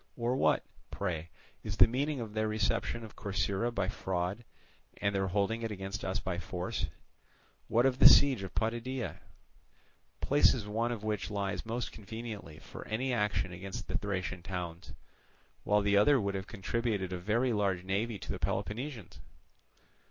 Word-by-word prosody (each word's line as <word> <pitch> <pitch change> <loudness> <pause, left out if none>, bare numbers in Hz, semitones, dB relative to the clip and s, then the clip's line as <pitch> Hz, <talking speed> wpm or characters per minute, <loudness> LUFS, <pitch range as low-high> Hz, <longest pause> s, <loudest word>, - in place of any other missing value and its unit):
Or 120 +1 +1
what, - - +3 0.2
pray, 85 -4 -3 0.3
is - - -4
the - - +10
meaning 140 +4 -1
of 110 -3 -5
their 110 0 +1
reception 110 +2 0
of 110 - -10
Corcyra 100 +3 -1
by 100 -5 0
fraud, 95 +2 -2 0.6
and 100 - +1
their 95 -1 +1
holding 100 +4 0
it 115 - -2
against 100 0 -5
us 95 +2 -1
by 90 -4 -3
force? 90 +1 -3 0.8
what 120 +2 +3
of 130 -1 +2
the - - +12
siege 135 -7 +6
of 95 - -7
Potidæa?—places 120 +1 -1
one 115 +3 0
of 110 -3 -4
which 105 -2 -1
lies 100 +1 -2
most 120 +1 -2
conveniently 110 -6 -7
for - - -10
any 125 +4 0
action 105 -5 0
against 95 +2 -6
the - - -4
Thracian 95 -3 -2
towns; 90 -2 -5 0.7
while 105 0 +3
the 100 0 +3
other 135 +7 +6
would 100 -2 -1
have 95 0 -4
contributed 105 -2 -1
a 90 - -3
very 115 +7 +1
large 100 -4 +1
navy 100 +4 -1
to - - -6
the - - -4
Peloponnesians? 120 - -3
105 Hz, 160 wpm, -32 LUFS, 95-115 Hz, 0.8 s, the